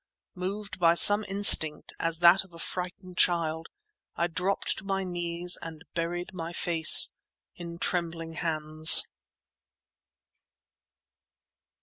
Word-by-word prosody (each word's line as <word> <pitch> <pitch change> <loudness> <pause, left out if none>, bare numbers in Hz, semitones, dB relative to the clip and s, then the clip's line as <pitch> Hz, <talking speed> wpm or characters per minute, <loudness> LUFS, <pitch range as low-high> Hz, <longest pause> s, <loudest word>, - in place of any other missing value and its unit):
Moved 200 +2 -8
by 170 -1 +2
some 205 +4 +6
instinct, 190 -6 +3
as 165 0 -2
that 175 +3 +4
of 180 -3 -21
a - - -13
frightened 180 +1 -9
child, 165 -2 -1 0.5
I 170 - -2
dropped 180 +3 -5
to - - -16
my 195 -1 -5
knees 175 -1 -2
and 160 -1 -11
buried 175 +2 -6
my 170 -1 -9
face 165 -2 +5 0.4
in 170 -1 -11
trembling 170 -2 -6
hands. 155 -1 +2
170 Hz, 110 wpm, -25 LUFS, 165-180 Hz, 0.5 s, some